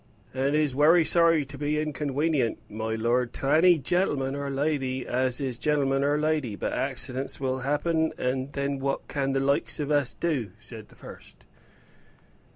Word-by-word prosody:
"And 135 Hz, +3 st, 0 dB
is 150 Hz, -3 st, +1 dB
wery 160 Hz, +5 st, +5 dB
sorry 165 Hz, -3 st, +4 dB
to 140 Hz, +1 st, -11 dB
be 150 Hz, +1 st, 0 dB
unconwenient, 145 Hz, -3 st, -1 dB
my 110 Hz, +1 st, -3 dB
lord, 120 Hz, +2 st, 0 dB
to 135 Hz, -, -2 dB
any 175 Hz, +2 st, +6 dB
gen'leman 140 Hz, -3 st, 0 dB
or 140 Hz, 0 st, -3 dB
lady 135 Hz, -2 st, -1 dB
as 125 Hz, 0 st, 0 dB
is 130 Hz, -4 st, -3 dB
a -, -, -29 dB
gen'leman 140 Hz, -2 st, +1 dB
or 145 Hz, +1 st, +2 dB
lady. 150 Hz, -7 st, 0 dB
But -, -, -3 dB
accidents 135 Hz, 0 st, -3 dB
will 130 Hz, -1 st, -1 dB
happen, 160 Hz, +4 st, 0 dB
and 130 Hz, +1 st, -2 dB
then 140 Hz, 0 st, -2 dB
what 135 Hz, 0 st, -2 dB
can 135 Hz, -1 st, -1 dB
the 135 Hz, -, +1 dB
likes 140 Hz, +3 st, 0 dB
of 150 Hz, 0 st, -2 dB
us 145 Hz, -4 st, +1 dB
do?" 130 Hz, -, -2 dB
said 115 Hz, -1 st, -11 dB
the -, -, -20 dB
first. -, -, -13 dB
140 Hz, 170 wpm, -26 LUFS, 130-150 Hz, -, any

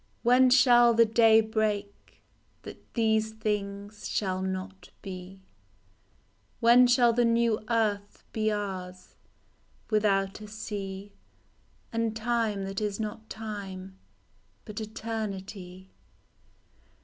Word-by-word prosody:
When 250 Hz, +2 st, +5 dB
shall 240 Hz, -2 st, +6 dB
the 230 Hz, 0 st, +6 dB
day 225 Hz, 0 st, +5 dB
break 215 Hz, -2 st, -3 dB, 0.4 s
That -, -, -12 dB
these 220 Hz, -1 st, +1 dB
things 205 Hz, -1 st, -4 dB
shall 185 Hz, -2 st, -1 dB
not 190 Hz, 0 st, -5 dB
be? 190 Hz, 0 st, -9 dB, 1.2 s
When 240 Hz, +1 st, +6 dB
shall 245 Hz, -1 st, +4 dB
the 240 Hz, +1 st, +2 dB
new 230 Hz, -2 st, +2 dB
earth 210 Hz, -3 st, -1 dB
be 215 Hz, -1 st, 0 dB
ours 185 Hz, -3 st, -5 dB, 0.8 s
Without 200 Hz, -2 st, +1 dB
a 210 Hz, -, -8 dB
sea, 205 Hz, -2 st, -6 dB, 0.8 s
And 230 Hz, -1 st, -1 dB
time 225 Hz, -3 st, -1 dB
that 195 Hz, +1 st, -4 dB
is 210 Hz, -1 st, -2 dB
not 220 Hz, +1 st, -5 dB
time, 195 Hz, -3 st, -7 dB, 0.7 s
But 215 Hz, 0 st, -6 dB
eternity 195 Hz, -4 st, -6 dB
215 Hz, 100 wpm, -28 LUFS, 195-225 Hz, 1.2 s, shall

